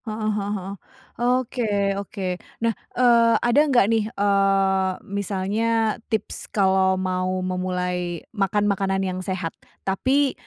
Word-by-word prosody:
Heeh 215 -1 -2
heeh 200 -1 -2
heeh. 195 +1 -6 0.5
Oke, 250 0 +1 0.4
oke. 200 0 -7 0.4
Nah, 230 0 +2 0.2
eee, 235 -2 +5
ada 240 +4 +4
enggak 265 -8 +4
nih 225 +1 +2
eee, 195 -2 +2 0.3
misalnya 200 +2 -1 0.5
tips 220 -3 -3
kalau 190 -2 +3
mau 185 0 -1 0.2
memulai 180 -2 -2
makan, 205 0 +1
makanan 195 -1 +1
yang 185 -1 -3
sehat? 185 -3 -3 0.3
Tapi, 265 +8 +2
195 Hz, 120 wpm, -23 LUFS, 190-225 Hz, 0.5 s, eee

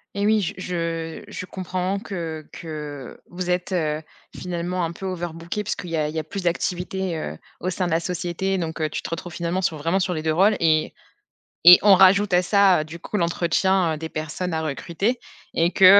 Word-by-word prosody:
Et 200 0 0
oui, 215 0 +4
j 180 - -3
je 165 -3 -3
je - - -6
comprends 185 +1 -3
que 165 -7 -5
que 150 -5 -7
vous 180 0 -3
êtes, 180 +1 -1
heu, 155 -3 0 0.3
finalement 180 0 -3
un 165 - -1
peu 180 +3 -8
overbookés 175 +1 -4
puisqu'il 185 -3 -4
y 165 - 0
a 150 -1 +1
il 155 - -8
y - - -2
a - - -3
plus 195 +3 -6
d'activités, 180 +1 -1
heu, 80 - -5 0.2
au 185 - -2
sein 185 0 -1
de 175 - -2
la 165 - +3
société, 180 +2 -2
donc, 165 -2 -3
heu, 155 - +1
tu - - -4
te - - -5
retrouves 165 +1 -5
finalement 170 +2 -1
sur, 165 -3 0
vraiment 165 +6 +1
sur 180 -1 0
les 155 - -3
2 160 -1 +1
rôles 200 +5 +4
et 155 -2 +2 0.7
et 175 +2 +12
on 205 -1 +8
rajoute 195 +1 +6
à 180 - +6
ça, 195 -1 +4
heu, - - -3
du 160 +2 -8
coup 195 +4 -4
l'entretien, 170 0 +2
heu, - - -4
des 160 +1 -6
personnes 160 +4 -4
à 160 - -1
recruter 170 - -1 0.3
et 170 +1 +2
que, 190 - +5
175 Hz, 220 wpm, -23 LUFS, 160-185 Hz, 0.7 s, et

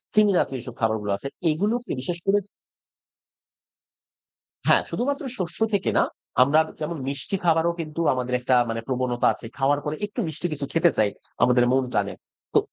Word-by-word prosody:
চিনিজাতীয় 200 -10 +4
যেসব 120 0 -8
খাবারগুলো 110 -2 0
আছে, 140 - -5 0.2
এগুলোকে 215 +9 -1
বিশেষ 170 +5 -3
করে 200 +1 +4 2.3
হ্যাঁ, - - +5
শুধুমাত্র 280 +4 -1
শস্য 180 +1 -4
থেকে 195 -2 +1
না। - - +5 0.4
আমরা 150 +4 +4 0.2
যেমন 160 +1 -3
মিষ্টি 140 +8 -2
খাবারও 165 0 +3
কিন্তু 160 +1 -3
আমাদের 125 0 -3
একটা 125 +1 +2
মানে 115 0 -2
প্রবণতা 125 -2 +1
আছে। - - -11
খাওয়ার 140 +1 +2
পরে 150 +1 -2
একটু 210 +4 -7
মিষ্টি 160 +3 -3
কিছু 145 -1 -4
খেতে 165 0 +4
চাই, 105 -2 +4 0.3
আমাদের 125 0 +5
মন 130 0 +3
টানে। 100 -1 0 0.4
তো - - +6
150 Hz, 155 wpm, -24 LUFS, 125-175 Hz, 2.3 s, তো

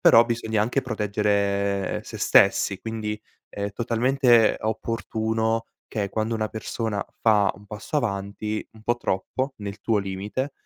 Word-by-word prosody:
però 115 +1 +7
bisogna 110 -2 0
anche 125 +5 +1
proteggere 100 -4 0
se - - -8
stessi, 100 -1 +4
quindi 110 -1 -4 0.3
è 100 0 -3
totalmente 120 0 +3
opportuno 110 0 -1 0.2
che 100 -3 -2
quando 110 +2 -1
una 110 -1 -1
persona 110 -2 -3 0.2
fa 105 -3 +4
un 100 +2 -16
passo 105 +8 -5
avanti, 105 -1 -3
un 110 -1 -16
po' 120 +1 +1
troppo 130 +6 -2
nel 100 0 -6
tuo 110 -1 +1
limite, 100 +8 -3
110 Hz, 135 wpm, -25 LUFS, 100-115 Hz, 0.3 s, però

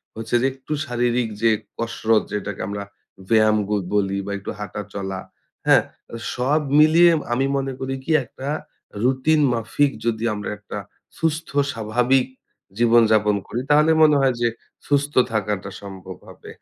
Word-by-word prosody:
হচ্ছে 115 +2 -3
যে - - +1
একটু 135 +3 -6
শারীরিক 120 -1 0
যে 115 - +4 0.3
কসরত 115 -1 +1
যেটাকে 105 -1 -4
আমরা 100 0 -4 0.5
ব্যায়াম 110 -1 +4
ব - - -11 0.2
বলি 100 -1 +1
বা 100 - -5
একটু 100 - -6
হাঁটা 105 0 -5
চলা, 95 -1 -4 0.5
হ্যাঁ? - - +6 0.3
আ - - -4 0.2
সব 140 +5 +1 0.2
মিলিয়ে 165 +3 +6 0.2
আমি 135 +3 +1
মনে 135 0 -2
করি 135 0 -3
কি 165 - -3
একটা 130 +2 -9 0.6
রুটিন 135 +4 +2
মাফিক 135 +5 +1
যদি 115 -1 -1
আমরা 105 0 -5
একটা 105 0 -8 0.4
সুস্থ 160 0 -1 0.2
স্বাভাবিক 125 +4 +1 0.5
জীবনযাপন 110 -3 +4
করি 120 - -3
তাহলে 150 +2 +5
মনে 150 -1 +6
হয় 130 -2 +3
যে 120 - +3 0.4
সুস্থ 145 0 +1 0.2
থাকাটা 105 -3 -2
সম্ভব 95 -2 -9
হবে। - - -13
120 Hz, 150 wpm, -22 LUFS, 105-135 Hz, 0.6 s, হ্যাঁ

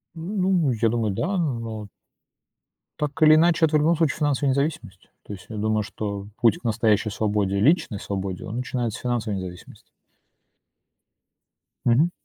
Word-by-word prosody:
Ну, 180 -3 0
я 115 0 +1
думаю, 115 -2 0
да, 180 - -1
но 115 -9 -3 1.1
так 150 +1 -3
или 155 0 +8
иначе, 165 0 +4
это 155 -1 0
в - - +5
любом 165 +3 +3
случае 160 -4 +1
финансовая 145 -2 +1
независимость. 140 - -3 0.2
То 105 - -7
есть 95 - -10
я 110 - -6
думаю, 110 0 0
что 100 -2 -5
путь 115 -4 +4
к - - -33
настоящей 110 -2 +1
свободе, 100 -2 0
личной 145 - +2
свободе, 95 -2 -4
он 110 +5 -5
начинается 120 -3 -3
с - - -13
финансовой 115 -5 -1
независимости. 90 -1 -10 2.0
Мгм. 140 +9 +3
120 Hz, 150 wpm, -24 LUFS, 105-155 Hz, 2.0 s, или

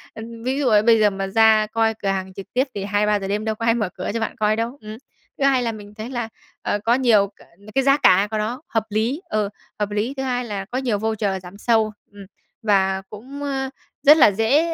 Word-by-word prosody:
ừm, 230 +1 -9
ví 260 +3 -1
dụ, 280 - +1
ờ, 210 -3 +5
bây 225 +1 +4
giờ 210 -1 +5
mà 195 -1 -4
ra 220 +1 +4
coi 225 0 +1
cửa 210 -2 -6
hàng 190 -1 -2
trực 195 0 -8
tiếp 260 +3 +1
thì 200 - -3
2:00-3:00 205 0 0
đêm 205 +2 -2
đâu 220 0 -1
có 230 - -4
ai 230 - +4
mở 215 -5 -1
cửa 185 - -4
cho 230 - -1
bạn 225 - -3
coi 215 0 +1
đâu, 230 +4 -3
ừm. 215 0 -8 0.4
Thứ 275 - +2
hai 265 -2 +3
là 230 - -1
mình 205 -2 -11
thấy 220 +2 -7
là, 240 -3 -4 0.3
ờ, 205 - -1
có 230 - +4
nhiều 235 -6 +4
c - - -20 0.4
cái 270 - +3
giá 275 +1 +4
cả 205 -8 +5
của 220 - -1
nó 225 +6 -3
hợp 225 - 0
lý, 225 - -1
ờ, 215 -2 -1 0.3
hợp 205 0 -1
lý, 210 +5 -1
thứ 265 - -2
hai 250 -1 -1
là 200 -4 -4
có 240 +5 -5
nhiều 250 -5 0
voucher 210 -3 -2
giảm 180 +2 -11
sâu, 220 0 +2 0.2
ừm, 200 -1 -12 0.4
và 190 -3 +2
cũng, 265 +7 -9
ờ, 270 -2 -2 0.3
rất 300 +2 +8
là 215 - +7
dễ, 275 - +2
220 Hz, 250 wpm, -22 LUFS, 205-245 Hz, 0.4 s, rất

